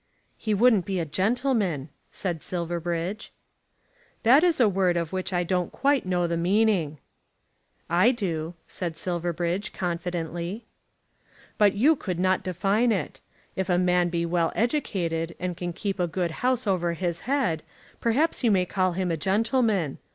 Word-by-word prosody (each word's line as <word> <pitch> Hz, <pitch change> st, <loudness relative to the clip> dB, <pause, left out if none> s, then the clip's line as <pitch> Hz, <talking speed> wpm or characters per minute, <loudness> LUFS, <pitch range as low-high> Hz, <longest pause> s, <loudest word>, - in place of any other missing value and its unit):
"He 215 Hz, -2 st, -1 dB
wouldn't 215 Hz, -4 st, +4 dB
be 190 Hz, -2 st, -1 dB
a 165 Hz, -, -1 dB
gentleman," 195 Hz, -, 0 dB, 0.2 s
said 175 Hz, -5 st, -3 dB
Silverbridge. 175 Hz, +2 st, -3 dB, 0.9 s
"That 260 Hz, +7 st, +6 dB
is 345 Hz, -5 st, +3 dB
a 240 Hz, -, +6 dB
word 185 Hz, -3 st, +2 dB
of 170 Hz, +1 st, -3 dB
which 185 Hz, 0 st, -2 dB
I 175 Hz, -1 st, +1 dB
don't 180 Hz, 0 st, -1 dB
quite 275 Hz, -6 st, +1 dB
know 180 Hz, -1 st, +1 dB
the 170 Hz, 0 st, -1 dB
meaning." 180 Hz, -4 st, +2 dB, 0.9 s
"I 175 Hz, +7 st, +4 dB
do," 175 Hz, -9 st, -2 dB
said 170 Hz, -3 st, -4 dB
Silverbridge 175 Hz, +2 st, -2 dB
confidently. 175 Hz, +2 st, -3 dB, 0.9 s
"But 205 Hz, -2 st, +5 dB
you 285 Hz, +10 st, +4 dB
could 185 Hz, -, -4 dB
not 185 Hz, +1 st, +2 dB
define 195 Hz, +6 st, +1 dB
it. 200 Hz, -, -3 dB, 0.3 s
If 190 Hz, 0 st, -2 dB
a 175 Hz, -, +3 dB
man 180 Hz, -1 st, +2 dB
be 170 Hz, -1 st, -1 dB
well 170 Hz, -1 st, +1 dB
educated, 175 Hz, -, -1 dB
and 180 Hz, -1 st, -3 dB
can 175 Hz, 0 st, -4 dB
keep 195 Hz, +3 st, -4 dB
a 175 Hz, -, +2 dB
good 175 Hz, 0 st, -2 dB
house 255 Hz, -1 st, +1 dB
over 175 Hz, -4 st, +1 dB
his 170 Hz, 0 st, -2 dB
head, 250 Hz, -, +1 dB, 0.4 s
perhaps 270 Hz, +7 st, +1 dB
you 235 Hz, -, +4 dB
may 190 Hz, -3 st, +3 dB
call 185 Hz, -1 st, 0 dB
him 180 Hz, 0 st, -1 dB
a 165 Hz, -, 0 dB
gentleman. 205 Hz, -, +1 dB
185 Hz, 155 wpm, -26 LUFS, 170-215 Hz, 0.9 s, That